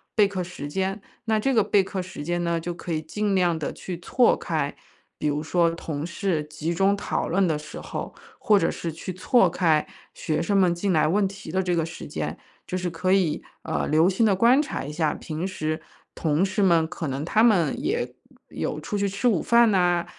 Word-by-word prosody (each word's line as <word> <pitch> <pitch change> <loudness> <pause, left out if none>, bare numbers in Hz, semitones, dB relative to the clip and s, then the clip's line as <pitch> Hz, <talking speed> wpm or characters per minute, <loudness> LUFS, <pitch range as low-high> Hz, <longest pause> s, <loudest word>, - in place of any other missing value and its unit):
备 210 - +6
课 195 -2 -3
时 175 -5 -7
间， 190 +5 -2 0.2
那 220 -1 +2
这 270 +5 +1
个 225 - +5
备 200 -1 +3
课 190 0 -4
时 180 -5 -8
间 175 +2 -1
呢， 170 -1 0
就 175 +1 -4
可 170 0 -5
以 155 - -1
尽 200 +5 -1
量 175 -3 +2
地 150 - -3
去 175 -2 -7
错 245 +7 +3
开。 - - -2 0.4
比 150 - -2
如 150 +1 -1
说 170 +1 +2
同 155 -3 -4
事 170 -1 -1
集 155 +2 -3
中 195 +3 +3
讨 - - -2
论 190 +3 +2
的 155 - +1
时 150 - -9
候， - - -6 0.3
或 210 - +4
者 165 - +1
是 170 - -4
去 165 +4 -6
错 185 +1 +3
开 160 -3 +2 0.3
学 155 - -2
生 200 +3 +1
们 180 -3 +4
进 185 +2 -1
来 155 - +3
问 195 +5 +2
题 195 -4 -9
的 190 +2 +1
这 180 -1 0
个 165 -1 +1
时 165 - -8
间， - - -4 0.3
就 185 - -2
是 180 -1 -2
可 180 +3 -1
以， 180 -6 +2 0.2
呃， - - -1
留 160 +4 +4
心 195 +4 +2
地 210 - +4
观 240 +8 +5
察 - - -4
一 145 - -5
下 155 -1 0
平 155 +2 -5
时 155 -4 -3 0.3
同 160 +3 +1
事 195 +1 0
们 170 -4 +4
可 170 -2 -5
能 135 +3 -3
他 215 +5 +3
们 210 -4 +3
也 410 +9 -1 0.4
有 - - -3
出 205 - -3
去 200 - +1
吃 200 +6 -1
午 205 -9 +3
饭 235 -2 +5
呐， 175 -2 +2
180 Hz, 240 characters per minute, -25 LUFS, 160-200 Hz, 0.4 s, 备